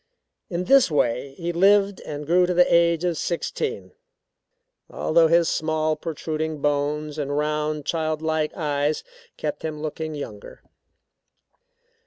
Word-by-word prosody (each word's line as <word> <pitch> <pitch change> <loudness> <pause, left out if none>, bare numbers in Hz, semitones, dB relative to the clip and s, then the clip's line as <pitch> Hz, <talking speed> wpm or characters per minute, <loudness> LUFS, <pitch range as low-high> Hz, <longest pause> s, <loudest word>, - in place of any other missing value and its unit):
In 175 -1 -2
this 270 +3 +5
way 135 -2 0
he 170 0 -3
lived 200 +2 +3
and 150 0 -5
grew 180 +3 +3
to 180 - -1
the 180 0 +6
age 170 0 +4
of 175 -3 0
sixteen, 440 - -3 1.0
although 165 0 +3
his 170 0 +4
small, 155 0 0
protruding 155 0 -4
bones 150 +1 -1
and 145 0 -2
round, 150 0 -1
child 155 -1 -1
like 160 -1 0
eyes 150 -1 -1 0.3
kept 150 -1 -4
him 155 -1 -4
looking 155 0 -4
younger. 105 -8 -9
155 Hz, 130 wpm, -24 LUFS, 150-170 Hz, 1.0 s, the